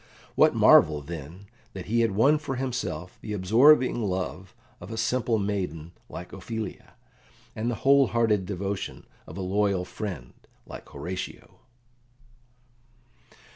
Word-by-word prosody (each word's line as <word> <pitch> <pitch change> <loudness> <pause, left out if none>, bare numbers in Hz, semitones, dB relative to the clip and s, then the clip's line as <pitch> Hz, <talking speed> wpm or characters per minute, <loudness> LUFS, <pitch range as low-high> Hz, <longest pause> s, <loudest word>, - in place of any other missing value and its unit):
What - - +4
marvel, 75 -2 +6
then, 85 +4 -8 0.3
that 95 -2 -7
he 115 +2 0
had 115 - +3
won 140 +9 +4
for 135 -3 -4
himself 125 -8 -4
the 105 - -5
absorbing 120 +7 +4
love 95 -1 -4 0.2
of 90 - -10
a 110 - -6
simple 115 0 +1
maiden 90 -6 -3 0.2
like 90 - -9
Ophelia, 105 +2 -6 0.6
and 110 +2 -2
the 120 - -1
whole 140 -1 +6
hearted 110 -5 +1
devotion 100 0 -4 0.2
of - - -9
a - - -4
loyal 95 -1 0
friend 90 - -6 0.3
like - - -11
Horatio? 90 +6 -7
100 Hz, 130 wpm, -26 LUFS, 90-115 Hz, 0.6 s, marvel